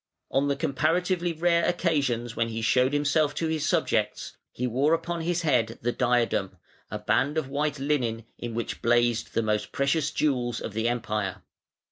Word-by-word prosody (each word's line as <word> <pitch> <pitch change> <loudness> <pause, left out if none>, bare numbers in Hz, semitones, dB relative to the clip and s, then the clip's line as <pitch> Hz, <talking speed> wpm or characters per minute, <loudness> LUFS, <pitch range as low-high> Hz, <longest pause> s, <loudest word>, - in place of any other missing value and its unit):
On 135 +2 +2
the 140 - +1
comparatively 170 +4 0
rare 170 +1 +2
occasions 135 -10 0
when 115 0 0
he 115 0 -4
showed 125 +3 +3
himself 145 +1 +1
to 165 - -1
his 160 -2 -1
subjects, - - 0 0.2
he 125 - -3
wore 135 +7 +2
upon 170 0 -4
his 175 +1 -1
head 120 -7 +1
the 120 - +1
diadem, 120 -7 0 0.3
a 105 - -4
band 120 +8 +1
of 150 -4 -1
white 145 +1 -1
linen, 125 -6 -1
in 120 -1 -5
which 115 - -4
blazed 120 -1 +2
the 115 - +2
most 105 -1 -1
precious 140 +2 +1
jewels 125 -6 0
of 105 - -6
the 110 +2 0
Empire. 105 -5 -2
135 Hz, 170 wpm, -27 LUFS, 115-155 Hz, 0.3 s, showed